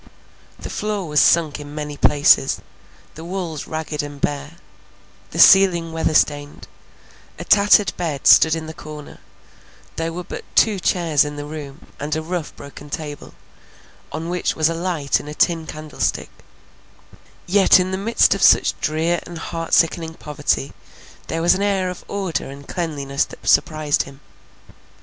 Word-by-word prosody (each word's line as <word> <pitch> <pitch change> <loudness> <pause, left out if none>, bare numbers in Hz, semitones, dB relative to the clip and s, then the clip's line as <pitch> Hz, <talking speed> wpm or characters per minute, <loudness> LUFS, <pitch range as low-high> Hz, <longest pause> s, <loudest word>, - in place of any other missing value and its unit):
The - - -8
floor 210 -4 -3
was 150 -1 +2
sunk 160 -3 +3
in 145 0 -9
many 150 -1 -5
places; 145 0 +3 0.5
the 160 - -10
walls 170 -4 -5
ragged 155 -1 -4
and 145 -1 -8
bare—the 145 +5 -8
ceiling 180 -4 +6
weather 160 -1 -1
stained—a 145 -1 -4
tattered 205 -1 +4
bed 155 -6 -4
stood 160 0 +6
in 160 -1 -5
the 160 - -8
corner; 150 -1 -11 0.8
there 165 0 -2
were 180 +2 -6
but - - -8
two 210 -3 +3
chairs 170 -5 +2
in 145 0 -6
the 145 0 -6
room, 150 -1 -9
and 150 +2 -3
a 160 - -2
rough 170 -1 -5
broken 140 +1 -12
table, 145 -1 -7 0.8
on 160 +3 -5
which 180 0 -1
was 155 0 +2
a - - -1
light 165 -4 -1
in - - -11
a 150 - -7
tin 165 -1 +1
candlestick;—yet 175 +5 -2
in 185 +1 -1
the 190 - -2
midst 225 +4 +3
of - - -5
such - - +5
drear 165 +2 0
and 175 - -8
heart 165 +1 -6
sickening 165 -1 +2
poverty, 145 -2 -2 0.5
there 165 +1 -3
was 175 - +5
an 195 - -2
air 195 -2 0
of 180 - -10
order 190 -8 -3
and 140 +1 -11
cleanliness 140 -5 -2
that - - -13
surprised 155 -2 +2
him. 135 0 -10
160 Hz, 155 wpm, -20 LUFS, 150-175 Hz, 0.8 s, ceiling